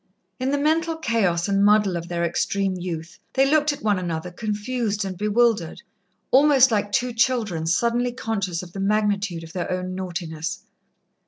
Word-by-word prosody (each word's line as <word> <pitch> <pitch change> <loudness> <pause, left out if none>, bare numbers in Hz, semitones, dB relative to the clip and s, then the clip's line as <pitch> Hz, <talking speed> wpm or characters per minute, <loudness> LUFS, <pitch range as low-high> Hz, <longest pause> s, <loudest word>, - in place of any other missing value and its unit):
In 255 +1 -1
the 285 - +1
mental 320 +3 +1
chaos 205 - +1
and 200 0 +2
muddle 205 -2 +4
of 170 0 -4
their 170 0 -2
extreme 195 +3 0
youth, 170 -2 -6
they 270 +1 +3
looked 300 +1 +3
at 290 - -8
one 205 -3 +2
another 175 -1 -4
confused 210 +1 -2
and 190 -1 -4
bewildered, 210 -3 +1 0.5
almost 270 -1 +6
like 205 -1 0
two 250 -1 0
children 230 -9 0
suddenly 235 +7 +1
conscious 200 -8 -3
of 175 -1 -12
the 195 - -6
magnitude 200 -3 0
of 160 - -11
their 175 -2 -3
own 185 0 -3
naughtiness. 175 -2 -5
205 Hz, 165 wpm, -23 LUFS, 180-240 Hz, 0.5 s, almost